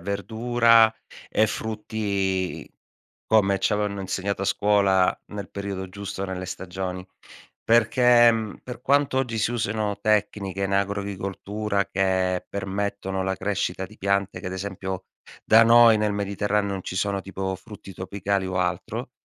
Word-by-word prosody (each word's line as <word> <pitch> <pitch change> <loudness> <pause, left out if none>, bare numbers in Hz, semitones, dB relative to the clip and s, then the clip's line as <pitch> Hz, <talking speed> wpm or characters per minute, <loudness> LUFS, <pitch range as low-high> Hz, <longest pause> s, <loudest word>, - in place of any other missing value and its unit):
verdura 115 +2 +3 0.4
e 110 - +3
frutti 100 -4 -2 0.6
come 100 -3 +3
ci 95 - +1
avevano 105 -1 -1
insegnato 95 +1 -2
a - - 0
scuola 100 -2 +3
nel 100 -3 -7
periodo 100 -2 -5
giusto 100 0 -5
nelle 95 -1 -5
stagioni, 95 0 -5 0.6
perché, 120 +1 +5
mhmm, 110 -2 -3
per 125 -1 -8
quanto 140 0 +2
oggi 125 -4 -1
si 110 - +1
usino 105 -3 -1
tecniche 100 -2 0
in 95 0 -1
agricoltura 100 +1 -2
che 95 -1 0
permettono 95 0 -3
la 95 0 -1
crescita 95 -2 -2
di 110 +3 -13
piante 100 0 0
che, - - -8
ad 95 - -4
esempio, 95 -1 -5 0.4
da 115 +1 +7
noi 115 -1 +7
nel 105 -1 +1
Mediterraneo 100 0 -1
non 95 -1 -4
ci 90 - -6
sono 100 0 0
tipo 95 0 -4
frutti 100 0 -11
tropicali 95 +1 -2
o 90 0 -3
altro. 90 0 -2
100 Hz, 140 wpm, -24 LUFS, 95-110 Hz, 0.6 s, da